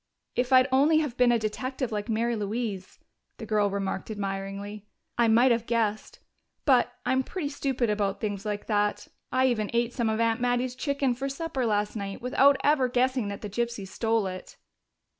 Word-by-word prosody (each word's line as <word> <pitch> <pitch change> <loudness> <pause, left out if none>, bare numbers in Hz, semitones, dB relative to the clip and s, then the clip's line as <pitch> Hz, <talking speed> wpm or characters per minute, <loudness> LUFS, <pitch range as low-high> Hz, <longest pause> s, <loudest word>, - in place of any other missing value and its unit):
"If 250 +1 0
I'd 255 0 +6
only 290 +4 +4
have 295 -6 0
been 250 -1 +4
a 240 - +4
detective 255 +4 -3
like 210 +1 -3
Mary 230 +2 0
Louise," 210 -2 -4 0.4
the 225 - -7
girl 210 -1 +2
remarked 195 0 -3
admiringly, 200 0 -5 0.3
"I 235 -1 +3
might 235 +3 +5
have 230 -1 0
guessed. 220 -2 -1 0.5
But 255 -3 +4
I'm 260 +1 +2
pretty 295 +2 -4
stupid 265 -4 -1
about 205 -2 -1
things 205 -3 -3
like 210 -1 -3
that. 210 -1 0 0.2
I 260 +1 +3
even 220 -5 +1
ate 235 0 +1
some 235 -4 0
of 220 0 -1
Aunt 230 +1 +1
Mattie's 245 0 0
chicken 275 -1 0
for 260 +3 -5
my - - -1
supper 275 -4 -2
last 210 0 0
night 200 -2 -5
without 270 +3 +4
ever 285 -3 +3
guessing 250 -2 +1
that 200 -1 -5
the 210 - -4
gypsies 235 -2 -3
stole 225 0 0
it." 185 -1 -7
235 Hz, 185 wpm, -27 LUFS, 210-255 Hz, 0.5 s, I'd